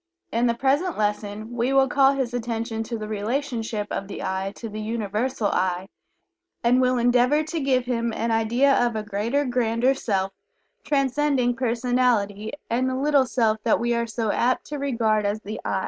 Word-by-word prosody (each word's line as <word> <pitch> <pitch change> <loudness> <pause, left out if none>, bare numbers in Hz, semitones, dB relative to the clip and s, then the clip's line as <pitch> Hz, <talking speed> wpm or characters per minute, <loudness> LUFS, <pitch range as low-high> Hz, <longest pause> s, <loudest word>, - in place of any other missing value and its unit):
In 235 +2 +2
the 235 - +1
present 285 +8 +1
lesson 210 +1 -2
we 240 +2 0
will 270 0 +5
call 275 +1 +4
his 260 -3 -2
attention 230 -1 -3
to 230 +1 -4
the 215 -1 -6
relationship 225 0 -2
of 195 - -3
the 200 - -6
"I" 190 +1 -2
to 230 - -7
the 215 0 -6
Universal 220 +1 -1
"I," 185 +1 -1 0.7
and 245 +2 +4
will 255 0 +2
endeavor 245 +5 +3
to 320 +2 -3
give 260 -3 +1
him 235 -2 -1
an 230 +1 -2
idea 235 +5 +3
of 240 -2 0
a 215 - -2
greater, 220 +7 -1
grander 245 0 +2
Self, 195 -7 -1 0.5
transcending 275 -3 +1
personality 235 -4 0 0.2
and 255 +3 0
the 260 - -2
little 280 0 +3
self 220 -3 +1
that 225 - +3
we 240 0 0
are 235 0 0
so 225 -1 -1
apt 250 +4 +1
to 295 -1 -4
regard 230 -6 +1
as 205 +1 -1
the 215 +1 -6
"I." - - -1
235 Hz, 180 wpm, -24 LUFS, 215-260 Hz, 0.7 s, will